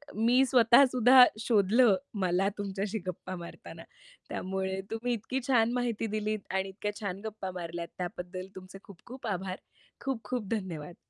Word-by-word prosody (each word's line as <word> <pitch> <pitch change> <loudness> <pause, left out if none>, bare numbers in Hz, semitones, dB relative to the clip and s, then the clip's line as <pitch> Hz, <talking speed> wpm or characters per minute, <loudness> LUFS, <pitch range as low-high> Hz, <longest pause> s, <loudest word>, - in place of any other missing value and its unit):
मी 240 +4 +4
स्वतःसुद्धा 250 0 +7 0.2
शोधलं 220 0 +4 0.3
मला 185 +2 +2
तुमच्याशी 200 +1 -3
गप्पा 185 +1 -5
मारताना, 170 -1 -10 0.5
त्यामुळे 190 0 -3
तुम्ही 235 +2 -1
इतकी 240 +4 -3
छान 235 -3 +3
माहिती 240 -3 -1
दिलीत 215 0 -1
आणि 190 0 0
इतक्या 205 +2 -4
छान 195 -1 -4
गप्पा 210 -3 -5
मारल्यात 170 0 -5
त्याबद्दल 180 +1 -5
तुमचे 185 +1 -10
खूप-खूप 230 +5 -10
आभार, 190 -1 -3 0.5
खूप-खूप 250 -3 -3
धन्यवाद. 175 -6 -5
205 Hz, 130 wpm, -30 LUFS, 185-235 Hz, 0.5 s, स्वतःसुद्धा